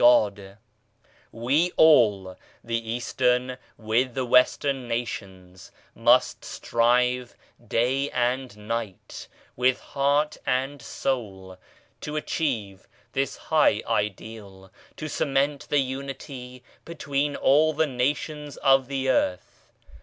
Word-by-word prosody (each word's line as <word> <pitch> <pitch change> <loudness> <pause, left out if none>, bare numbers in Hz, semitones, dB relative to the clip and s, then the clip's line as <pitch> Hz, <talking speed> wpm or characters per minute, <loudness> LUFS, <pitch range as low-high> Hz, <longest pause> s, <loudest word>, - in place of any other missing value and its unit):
i8 - - +2
GOD 110 -4 +6
COMPREHENDS 100 -1 -13 0.8
ALL - - -13
We 150 +8 +2
all, 105 -12 +5 0.3
the 115 -1 -3
Eastern 125 +1 0 0.2
with 115 +3 0
the 130 -1 -1
Western 125 +1 +2
nations, 95 -6 -6 0.2
must - - +3
strive 125 +1 +1 0.3
day 130 +6 +1
and 125 -2 -1
night 115 -5 -5 0.3
with 130 +1 +2
heart 145 +2 0
and 135 +2 -1
soul 95 -10 -4 0.4
to 150 - -6
achieve 115 - -3 0.2
this - - -2
high - - +2
Ideal, 100 -2 -4 0.3
to 155 - -5
cement 140 0 -1
the 145 - +2
Unity 130 -2 -5 0.2
between 145 -3 -2
all 150 +4 +4
the 160 +1 +1
Nations 145 +2 -2
of 135 -2 +3
the 135 -1 -2
Earth. 90 -8 -1
125 Hz, 110 wpm, -25 LUFS, 115-140 Hz, 0.8 s, GOD